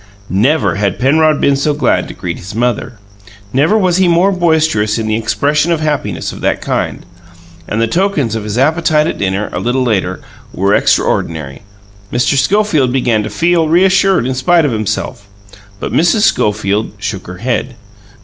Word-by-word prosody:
Never 120 - +1
had 100 -2 -1
Penrod 155 +3 +2
been 140 - +2
so 145 +2 0
glad 135 -5 +1
to - - -9
greet 85 -2 -5
his 100 +4 -9
mother. 120 +1 -1 0.6
Never 155 +11 +3
was 185 -4 +2
he 190 -1 +3
more 175 +3 +3
boisterous 160 - +1
in 110 - -2
the 110 0 0
expression 145 +8 0
of 165 - +1
happiness 150 -2 -2
of - - -10
that - - 0
kind. - - -3 0.6
And 105 - -2
the 115 - +3
tokens 155 - 0
of 110 -1 -3
his 105 +1 -4
appetite 155 +2 +2
at - - -3
dinner, 100 +2 -2
a - - -2
little 125 +2 0
later, 95 -6 -1 0.4
were 100 +2 +1
extraordinary. 75 -8 0 0.5
Mr. 120 +3 +1
Schofield 155 -2 +2
began 125 -4 +1
to - - -4
feel 170 -1 +1
reassured 190 -1 +3
in 130 - -1
spite 160 +6 +2
of 145 - 0
himself; 110 -2 -3 0.5
but - - -5
Mrs. 175 +6 +2
Schofield 105 - 0
shook 100 -1 -5
her 90 - -8
head. 125 +3 -2
130 Hz, 170 wpm, -14 LUFS, 105-160 Hz, 0.6 s, Never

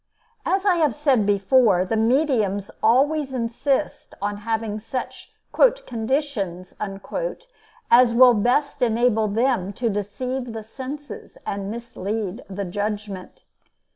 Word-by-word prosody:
As 385 +1 +1
I 370 -3 +4
have 305 -7 +2
said 270 -8 +2
before, 200 -1 +4
the 205 - -1
mediums 220 -5 +1
always 275 +5 +3
insist 260 +4 -2
on 205 +1 -2
having 220 0 -2
such 250 +4 -6 0.2
"conditions" 245 - 0 1.2
as 240 0 +7
will 245 +1 +7
best 250 +6 +1
enable 230 -2 +2
them 215 -2 0
to 230 +2 -1
deceive 245 +5 -4
the 220 -1 -6
senses 275 - -8
and 200 0 -3
mislead 220 -2 -4
the 200 +1 -4
judgment. 205 0 -5
230 Hz, 110 wpm, -23 LUFS, 205-265 Hz, 1.2 s, as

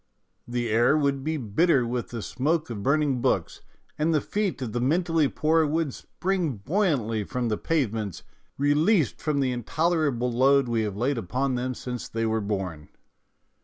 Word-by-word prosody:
The 120 -1 -2
air 120 +7 +4
would 140 -2 0
be 155 +2 -1
bitter 130 - +2
with 120 0 -3
the 115 -3 -5
smoke 155 +3 -1
of 105 -3 -5
burning 140 0 +1
books, 100 -9 0 0.4
and 155 +2 +2
the - - +4
feet 205 +2 -2
of 115 - -4
the 120 - -1
mentally 165 +2 +2
poor 160 +3 +2
would 155 -2 0
spring 180 -6 -2
buoyantly 120 - 0
from 120 +3 -2
the 105 - 0
pavements, 115 - -1 0.3
re 145 +1 +3
leased 160 - +2
from 150 -2 0
the 130 -1 +1
intolerable 135 0 0
load 135 +2 +4
we 115 -1 0
have 105 -2 -3
laid 125 +3 0
upon 130 +7 -1
them 125 +1 -2
since 125 -1 -5
they 115 0 -2
were 110 0 0
born. 95 -7 -4
130 Hz, 170 wpm, -26 LUFS, 115-155 Hz, 0.4 s, air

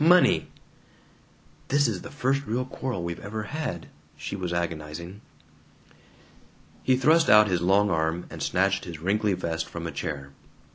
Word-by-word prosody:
Money!" 175 +2 +5 1.2
("This 145 +1 +3
is - - -2
the - - -8
first 140 0 0
real 125 +3 -1
quarrel 130 -7 -4
we've 85 0 -4
ever 110 +2 -4
had," 125 - -4 0.3
she - - -5
was 90 -3 -3
agonizing.) 85 +2 -4 1.6
He 130 -1 +3
thrust 160 +5 +4
out 105 0 +8
his 90 -3 0
long 100 +3 +3
arm 80 +1 0
and - - -8
snatched 95 +1 +1
his 85 -3 -7
wrinkly 100 +4 +1
vest 80 -2 -3
from 85 0 -6
a 85 - -3
chair. 70 -5 -5
95 Hz, 150 wpm, -26 LUFS, 85-125 Hz, 1.6 s, out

